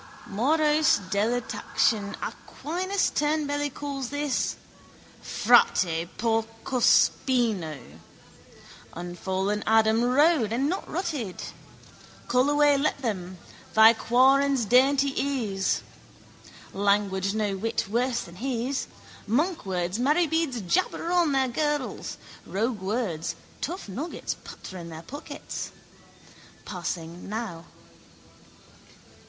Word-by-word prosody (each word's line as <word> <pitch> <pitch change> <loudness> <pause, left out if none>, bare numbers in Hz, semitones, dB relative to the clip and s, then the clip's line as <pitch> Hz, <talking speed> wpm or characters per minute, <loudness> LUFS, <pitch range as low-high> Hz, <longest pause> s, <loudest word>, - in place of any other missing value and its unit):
Morose 300 +8 +3
delectation 215 -1 0
Aquinas 370 +5 -2
tunbelly 290 -1 0
calls 275 -2 -5
this, 290 -1 -1 0.7
frate 165 -1 +3
porcospino. 225 - +1 1.2
Unfallen 190 +4 -2
Adam 220 0 +4
rode 260 -2 +3
and 260 +5 +1
not 370 +5 -3
rutted. 295 - -3 0.8
Call 250 +3 +3
away 290 -1 +4
let 295 0 0
him: 185 -7 -3 0.4
thy 220 +1 +9
quarrons 265 +2 +3
dainty 270 +4 +4
is. 240 -9 -1 0.9
Language 200 0 +1
no 210 -2 0
whit 225 +4 -1
worse 240 +3 0
than 170 +1 -11
his. 255 +3 -2 0.4
Monkwords, 205 - 0
marybeads 310 -2 +1
jabber 330 - 0
on 350 -4 +3
their 270 -1 +2
girdles: 295 +2 -2 0.3
roguewords, 200 -6 -2 0.3
tough 355 - -4
nuggets 275 - -4
patter 185 - -9
in 170 -1 -8
their 160 0 -9
pockets. 285 - -7 0.9
Passing 175 -1 -5
now. 210 -6 -5
240 Hz, 90 wpm, -26 LUFS, 200-285 Hz, 1.2 s, thy